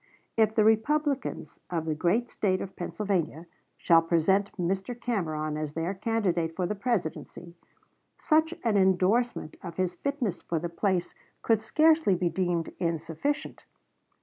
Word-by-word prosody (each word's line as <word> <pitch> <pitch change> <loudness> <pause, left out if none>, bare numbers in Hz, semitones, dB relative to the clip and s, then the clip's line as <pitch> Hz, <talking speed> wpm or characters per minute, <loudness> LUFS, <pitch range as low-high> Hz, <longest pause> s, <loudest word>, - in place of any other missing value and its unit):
If 220 -1 +3
the 215 - +4
Republicans 225 - 0
of 165 -3 -2
the 160 - 0
great 180 +10 +1
State 190 -5 0
of 190 0 -7
Pennsylvania 175 -4 -2 0.3
shall 165 -1 +5
present 175 +5 +2
Mr. 195 +6 -2
Cameron 155 -10 -2
as 155 -1 -4
their 165 +4 -2
candidate 190 -6 -1
for 180 - -1
the 210 - -1
Presidency, 190 -5 -3 0.6
such 315 +1 +2
an 225 -4 +2
indorsement 190 +1 +2
of 170 -1 -8
his 185 -1 0
fitness 280 - -2
for 170 - -2
the 170 +2 -3
place 180 0 -1 0.3
could 225 -2 +3
scarcely 310 - +4
be 175 0 0
deemed 175 -1 -1
insufficient. 165 - -2
190 Hz, 140 wpm, -28 LUFS, 170-225 Hz, 0.6 s, shall